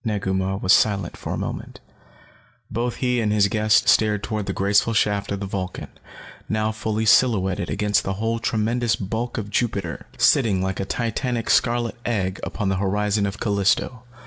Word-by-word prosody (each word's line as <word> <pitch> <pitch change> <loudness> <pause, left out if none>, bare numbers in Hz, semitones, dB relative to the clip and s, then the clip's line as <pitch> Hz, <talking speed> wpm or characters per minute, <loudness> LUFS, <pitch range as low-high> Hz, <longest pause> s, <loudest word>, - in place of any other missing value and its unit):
Negu 105 -4 -1
Mah 95 0 -1
was 95 -1 +3
silent 100 0 +2
for - - -6
a - - -2
moment. - - -6 0.9
Both 120 +2 -2
he 125 -2 0
and 105 -2 0
his 105 -1 +3
guest 110 +1 +2
stared 105 -2 +3
toward 105 -2 -3
the - - -1
graceful 100 +3 +2
shaft 105 -2 +1
of 100 0 -3
the - - -2
Vulcan, 95 -1 -5 0.6
now 110 0 0
fully 110 0 -2
silhouetted 100 -6 +3
against 105 -1 +1
the 95 - -2
whole 115 +3 -2
tremendous 115 +1 0
bulk 110 +5 -4
of 105 -2 -5
Jupiter, 100 - -2
sitting 110 -8 +3
like 95 0 -2
a 95 - -2
titanic 120 +1 -2
scarlet 120 -1 +1
egg 95 -5 -1
upon 100 -3 -3
the 95 - 0
horizon 100 +1 0
of 100 0 -6
Callisto. 100 +3 0
105 Hz, 170 wpm, -23 LUFS, 95-115 Hz, 0.9 s, was